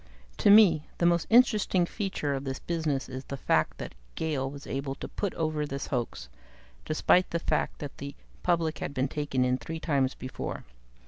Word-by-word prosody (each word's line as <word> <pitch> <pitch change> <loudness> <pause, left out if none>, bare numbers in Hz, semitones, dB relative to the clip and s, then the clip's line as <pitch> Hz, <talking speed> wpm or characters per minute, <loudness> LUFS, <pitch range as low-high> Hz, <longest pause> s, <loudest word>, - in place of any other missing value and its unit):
"To - - +3
me, 195 -8 +7
the 170 - +1
most 170 -1 +3
interesting 215 -6 +4
feature 185 -7 -2
of 135 0 -3
this 135 -1 -3
business 155 -6 -2
is 130 0 -7
the 140 - -5
fact - - +1
that - - -7 0.2
Gale 140 -4 -1
was 140 +1 -9
able 135 0 -3
to - - -7
put 200 - -3
over 155 -2 -1
this 140 -1 -4
hoax, 120 - -2 0.6
despite 180 +3 +3
the 170 - 0
fact 165 - -1
that 145 -3 -8
the 140 0 -6 0.3
public 165 -3 +1
had 140 - -4
been 130 +1 +1
taken 135 -3 0
in 125 0 +1
three 160 +8 -5
times 140 -5 +1
before. 130 - -5
150 Hz, 185 wpm, -29 LUFS, 135-170 Hz, 0.6 s, me